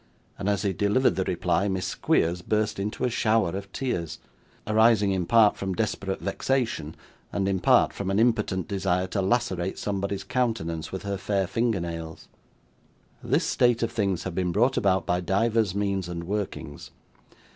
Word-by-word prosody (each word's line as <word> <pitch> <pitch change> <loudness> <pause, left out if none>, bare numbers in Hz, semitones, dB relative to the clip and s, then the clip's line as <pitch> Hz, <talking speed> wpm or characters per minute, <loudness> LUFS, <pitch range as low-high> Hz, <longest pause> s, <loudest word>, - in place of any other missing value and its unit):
And 100 0 -1
as 100 -1 0
he 100 -2 0
delivered 105 +7 +2
the - - 0
reply, 100 - 0
Miss 95 -2 -1
Squeers 85 +2 +1
burst 105 +2 -1
into 105 +2 -3
a 125 - +2
shower 110 -4 +2
of 100 +2 -6
tears; 85 - -3 0.5
arising 110 -1 +4
in 90 -3 -1
part 110 0 +5
from 95 -1 -3
desperate 100 -2 -2
vexation, 120 - -1 0.4
and 95 -1 -1
in 95 -1 0
part 90 - +4
from 100 -1 -4
an 95 - +1
impotent 105 -6 +1
desire 95 -2 0
to 95 +2 -2
lacerate 95 -3 0
somebody's 100 -1 -2
countenance 95 -9 -2
with 95 - -5
her 100 -1 -2
fair 100 0 0
finger 115 +2 0
nails. 85 -1 -6 0.9
This - - +1
state 120 -1 +2
of 115 - -1
things 100 -6 -1
had 95 - -4
been 90 0 -1
brought 120 +8 +2
about 95 -3 +2
by 90 +1 0
divers 105 +1 +1
means 100 -3 -1
and 85 -1 -5
workings. 95 -6 -5
100 Hz, 165 wpm, -26 LUFS, 90-110 Hz, 0.9 s, part